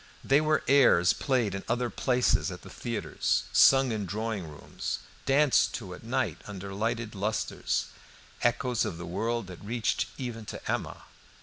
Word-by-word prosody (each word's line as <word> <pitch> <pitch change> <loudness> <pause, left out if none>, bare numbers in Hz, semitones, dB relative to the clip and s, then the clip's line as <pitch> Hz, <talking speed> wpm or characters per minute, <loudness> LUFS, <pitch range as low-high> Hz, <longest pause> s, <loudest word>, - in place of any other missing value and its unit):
They 140 +2 +4
were 155 0 +2
airs 125 -11 +5
played 125 -7 0
in 95 - -4
other 120 0 0
places 125 -1 +2
at - - -8
the - - -11
theatres, 115 -3 -1
sung 135 -2 +6
in 105 -3 -2
drawing 105 -1 -3
rooms, 75 -2 -5 0.3
danced 140 0 +4
to - - -6
at - - -11
night - - -1
under 100 -1 -7
lighted 115 +2 -2
lustres, 105 +2 -1 0.6
echoes 120 0 +1
of 80 - -3
the 85 - -6
world 115 +6 -2
that 90 0 -11
reached 115 +1 -1
even 120 -4 -5
to - - -5
Emma. - - -3
115 Hz, 160 wpm, -29 LUFS, 100-125 Hz, 0.6 s, sung